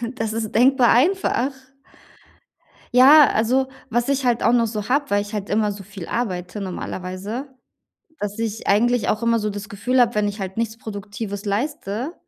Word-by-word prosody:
das 225 -3 -3
ist 225 -1 -3
denkbar 255 +1 +4
einfach. 285 -1 +2 1.4
Ja, 280 +4 +8
also 255 +5 +1 0.2
was 240 +2 0
ich 275 -1 0
halt 240 -1 +1
auch 230 - +4
noch 235 -1 +3
so 210 -1 -5
habe, 285 +2 +1
weil 205 0 +2
ich 205 +1 -8
halt 205 -2 -4
immer 210 0 +1
so 200 -1 -9
viel 195 -3 -9
arbeite 190 -3 -3
normalerweise, 190 +6 -5 0.7
dass 205 +1 -4
ich 225 -1 -3
eigentlich 240 +4 +2
auch 215 +2 -1
immer 230 0 +2
so 210 0 -2
das 205 0 -7
Gefühl 250 +6 0
habe, 240 -2 +3
wenn 210 -1 +1
ich 205 +1 -5
halt 190 0 -5
nichts 225 -1 -2
Produktives 205 -1 -6
leiste 230 - -3
220 Hz, 175 wpm, -22 LUFS, 205-245 Hz, 1.4 s, Ja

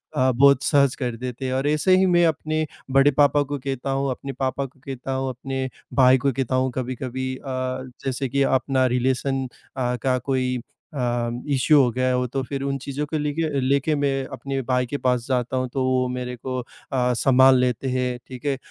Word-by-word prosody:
अ, 130 0 +3
बहुत 140 +2 +5
सहज 140 -3 +3
कर 125 -3 -3
देते 125 +2 -5
हैं 130 - -1
और 135 +2 0
ऐसे 155 +5 +3
ही 190 - +4
मैं 175 -2 +4
अपने 155 0 -1 0.3
बड़े 135 +2 +5
पापा 145 +1 +4
को 145 +1 -4
कहता 135 0 -3
हूँ, 135 0 0
अपने 135 +2 -5
पापा 135 +1 -2
को 135 +1 -15
कहता 135 -1 -5
हूँ, 130 0 -1
अपने 130 +1 -4 0.2
भाई 130 -1 +6
को 140 +2 +1
कहता 130 0 -1
हूँ। 130 0 +1
कभी-कभी 130 +1 -3
अ, - - -17 0.6
जैसे 135 0 -2
कि 140 +2 +2
अपना 130 0 +2
रिलेशन 130 +1 0 0.3
अ, 125 -1 0
का 130 -1 +2
कोई 130 -1 -1 0.3
अ, 145 - -5 0.5
इश्यू 140 +2 +5
हो 125 - +3
गया 130 +2 0
हो 125 0 +1
तो 135 +3 -2
फिर 135 +1 -4
उन 140 0 -1
चीज़ों 140 +2 -3
को 155 +2 -3
लेके 150 +1 -2
अ, 150 -3 -1
लेके 140 +3 +1
मैं 140 -1 +1 0.2
अपने 135 -1 -3
भाई 125 0 +2
के 145 +4 -4
पास 125 -3 0
जाता 130 -1 0
हूँ 130 0 0
तो 135 - 0
वो 130 0 +2
मेरे 125 0 -4
को 130 +1 -5
अ, - - -4 0.5
संभाल 130 +2 +5
लेते 125 +1 0
हैं। 125 -1 -1
ठीक 130 0 -10
है? 140 -2 0
130 Hz, 210 wpm, -23 LUFS, 130-140 Hz, 0.6 s, भाई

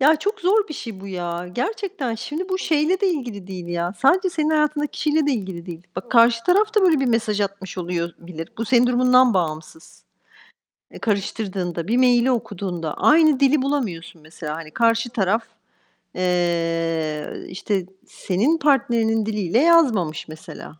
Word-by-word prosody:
Ya, 305 +4 +5
çok 410 +8 -3
zor 400 +3 +2
bir 305 - -6
şey 225 -8 -8
bu 195 - -9
ya. 175 -2 -5
Gerçekten. 355 - -3
Şimdi 305 - -5
bu 375 0 -1
şeyle 325 +2 +1
de 400 - +3
ilgili 240 - -4
değil 185 -3 -7
ya, 175 0 -2
sadece 370 +7 +3
senin 315 -2 -1
hayatındaki 300 -1 +1
kişiyle 300 0 0
de 290 - +2
ilgili 190 -7 -5
değil. 170 -2 -8
Bak 190 - -6
karşı 230 -1 +4
taraf 415 +4 +2
da 425 - +4
böyle 330 -6 +4
bir 270 - +1
mesaj 225 -3 0
atmış 195 -1 -4
oluyor 170 -1 -2
bilir. 170 -2 -8
Bu 230 - -1
senin 245 +2 +4
durumundan 250 -1 +4
bağımsız. 160 -2 -4 0.9
E, - - -11
karıştırdığında, 190 -5 -3
bir 235 +3 +1
mail'i 250 0 +4
okuduğunda 180 -9 -3
aynı 310 -3 +4
dili 275 +1 +3
bulamıyorsun 220 - -3
mesela. 155 -1 -7
Hani, 160 -1 -9
karşı 230 +4 +1
taraf, 220 0 0 0.7
eee, 165 -3 -1 0.2
işte 190 0 -2 0.2
senin 225 - 0
partnerinin 235 -7 +2
diliyle 210 -1 0
yazmamış 255 - +3
mesela. 155 0 -11
225 Hz, 160 wpm, -22 LUFS, 175-290 Hz, 0.9 s, Ya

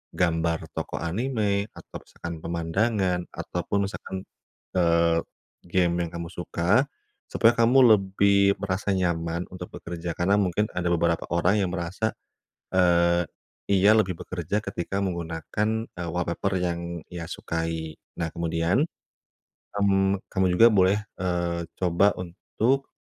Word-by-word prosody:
gambar 85 -1 +1
tokoh - - -4
anime, 105 +1 0
atau - - -9
misalkan 85 0 -7
pemandangan, 90 +3 0
ataupun 95 +3 -2
misalkan, 95 -3 -6 0.5
eee, 85 -1 +3 0.5
game 85 -1 +2
yang 80 - -8
kamu 85 0 -5
suka, 90 +9 +1 0.4
supaya 115 - +4
kamu 120 +3 +5 0.2
lebih 100 +1 +3
merasa 100 +1 -1
nyaman 85 -1 -1
untuk 90 -1 -7
bekerja. 85 0 -5
Karena 95 +3 +3
mungkin 100 +2 +1
ada 90 -1 -1
beberapa 85 0 +1
orang 90 +5 +3
yang 90 -2 0
merasa 95 +5 -2 0.6
eee 85 -1 +4 0.5
ia 100 +3 +6
lebih 95 -4 +2
bekerja 95 +3 -3
ketika 100 0 -3
menggunakan 85 +3 -2 0.2
eee 85 -1 -5
wallpaper 90 +3 -1
yang 85 -1 -3
ia 85 -1 -6
sukai. 80 -2 -3 0.2
Nah 85 -1 -1
kemudian 85 - +1 0.9
hmm 95 -1 +2
kamu 95 -1 +1
juga 115 - +9
boleh 95 +1 +4 0.2
eee 85 -2 -1
coba 90 +3 +3
untuk 115 +9 -1
90 Hz, 120 wpm, -26 LUFS, 85-100 Hz, 0.9 s, juga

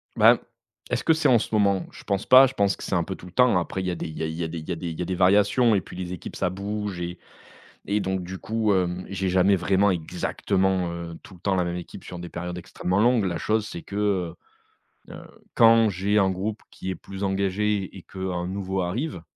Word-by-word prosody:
Ben, - - +6 0.5
est-ce - - -1
que 160 - +4
c'est 160 - +2
en 120 -3 +6
ce - - -4
moment? 100 -3 +2
Je - - -13
pense 100 -1 -1
pas. 130 +1 +8
Je 130 - -7
pense 100 -3 +2
que - - -10
c'est 95 - -1
un 85 - +2
peu 95 - -5
tout - - -13
le - - -12
temps. 125 -2 +4
Après 95 +2 -3
il 95 - -3
y - - 0
a - - -3
des - - -5
il 80 -1 -8
y 80 - -3
a - - +1
il 80 0 -4
y 85 - -2
a - - -1
des 80 0 -5
il 80 +1 -5
y - - -1
a - - -1
des 95 - -2
variations 105 +5 +4
et 95 - +2
puis - - -12
les 90 -1 -5
équipes, 90 - -8
ça - - 0
bouge 100 0 -4
et 85 +1 -5 0.7
et 105 +1 +1
donc 95 -1 -2
du 95 +2 -7
coup, 110 0 0
hem, 90 -1 -1
j'ai 95 0 -2
jamais 95 +2 +4
vraiment, 95 +3 +2
exactement, 90 +2 -1
heu, 85 -1 -6
tout 95 - -14
le 85 - -17
temps, 100 -1 0
la 90 - +2
même 85 0 -3
équipe 90 - -8
sur 90 - -8
des 85 - -7
périodes 90 +1 -5
extrêmement 95 +1 -2
longues. 120 -1 +4
La 85 -2 -2
chose, 110 0 0
c'est 85 - -7
que, 100 - -8 1.1
heu - - -9
heu, - - -9 0.3
quand 115 -1 +6
j'ai 100 +2 0
un 95 -1 +3
groupe 100 +4 -3
qui 95 - -7
est - - -4
plus 95 0 -8
engagé 100 +1 0
et 95 - -9
qu'un 95 -2 -4
nouveau 95 0 -2
arrive, 100 - -3
95 Hz, 255 wpm, -25 LUFS, 90-100 Hz, 1.1 s, pas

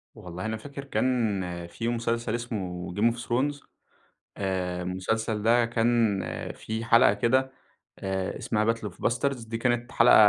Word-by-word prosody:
والله 90 +3 -7
أنا 110 0 -1
فاكر 140 +4 -8
كان 120 -7 +1 0.3
في 115 +6 -4
مسلسل 115 -1 0
اسمه 95 -7 -4
Game 115 +3 +3
of - - -12
Thrones، 140 +5 0 0.8
آآ، 90 -2 -1
المسلسل 105 +4 -1
ده 115 +2 +4
كان 115 -3 +2 0.3
في 110 +1 -4
حلقة 115 -2 +6
كده، 130 +5 +2 0.5
آآ، 95 -1 -2
اسمها 110 +1 +1
battle 110 -2 -6
of - - -17 0.2
bastards، 120 -1 -1
دي 115 0 -3
كانت 120 0 0
حلقة 120 +1 +6
115 Hz, 145 wpm, -27 LUFS, 100-120 Hz, 0.8 s, حلقة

